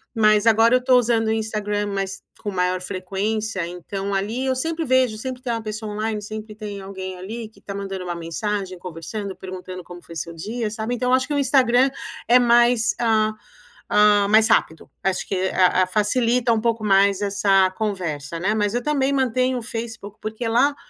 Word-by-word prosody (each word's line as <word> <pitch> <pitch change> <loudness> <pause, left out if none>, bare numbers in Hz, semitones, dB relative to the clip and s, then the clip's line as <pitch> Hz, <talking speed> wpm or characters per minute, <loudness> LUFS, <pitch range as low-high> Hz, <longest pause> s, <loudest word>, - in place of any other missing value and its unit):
mas 215 0 +4
agora 225 +2 +5
eu 250 - +1
tô 255 -1 +5
usando 230 -2 +2
o - - +2
Instagram, 210 -2 -1
mas 195 -1 -4 0.2
com 205 - -3
maior 180 -1 0
frequência, 195 +1 -3
então 195 +3 -5
ali 220 +7 -2
eu 260 -1 +1
sempre 325 +4 -2
vejo, 255 -4 +2
sempre 255 0 -5
tem 240 -2 -1
um 230 - -2
pessoa 215 0 -5
online, 215 0 -2
sempre 215 0 -7
tem 205 -2 -7
alguém 190 -1 -6
ali 220 +4 -6
que 220 - -22
tá 200 - -7
mandando 195 -2 -5
uma 175 -1 -4
mensagem, 185 +3 -3
conversando, 185 +4 -6
perguntando 185 -1 -8
como 175 0 -11
foi 170 - -12
seu 165 +2 -5
dia, 215 +6 -4
sabe. 220 +2 -3
Então 250 +1 -1
eu - - +4
acho 260 0 0
que 295 - -3
o - - +1
Instagram 260 -1 +4 0.4
é 245 +2 +6
mais, 240 -1 +4
hã 220 -2 +2 0.6
hã, 210 -1 +5
mais 220 +2 +5
rápido. 160 -6 +1
Acho 190 -1 -1
que - - -2 0.2
a 185 0 +4
a 185 - -1
facilita 235 +4 +1
um 220 - 0
pouco 230 -1 0
mais 200 -1 +3
essa 195 -2 +3
conversa, 170 -7 -3
né. 195 +5 +1
Mas 205 0 0
eu 245 - -1
também 280 -2 +1
mantenho 255 -1 +1
o - - -7
Facebook 225 -3 -6
porque 220 +2 -4
lá, 250 +6 +3
215 Hz, 195 wpm, -22 LUFS, 195-235 Hz, 0.6 s, é